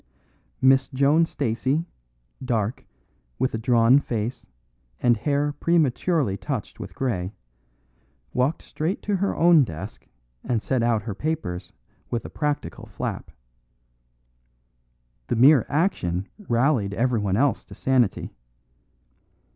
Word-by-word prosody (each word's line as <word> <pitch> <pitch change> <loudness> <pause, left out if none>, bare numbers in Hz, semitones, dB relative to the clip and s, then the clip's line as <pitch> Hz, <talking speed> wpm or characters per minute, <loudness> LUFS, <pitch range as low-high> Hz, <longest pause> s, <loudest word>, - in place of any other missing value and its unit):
Miss 135 0 +5
Joan 145 +5 +3
Stacey, 135 +5 -1 0.6
dark, 115 -2 -1 0.5
with 130 - 0
a 115 - -2
drawn 120 +3 +5
face 120 -2 -4 0.5
and 120 -1 +4
hair 145 +5 0
prematurely 150 - +1
touched 95 - -5
with - - -8
grey, 100 -8 -2 1.0
walked 135 +6 0
straight 165 +6 -3
to 205 -1 0
her 200 +2 -1
own 170 -3 +6
desk 95 -2 -8 0.4
and 120 -3 0
set 130 +3 -1
out 115 -3 +1
her 105 - -4
papers 95 - -4 0.4
with 120 - -3
a - - -8
practical 150 -1 -3
flap. - - -5 2.0
The - - 0
mere 130 +2 +6
action 100 - 0 0.2
rallied 120 -4 +2
everyone 110 -5 +1
else 140 +3 +1
to - - -12
sanity. 130 -5 +1
125 Hz, 115 wpm, -24 LUFS, 110-145 Hz, 2.0 s, own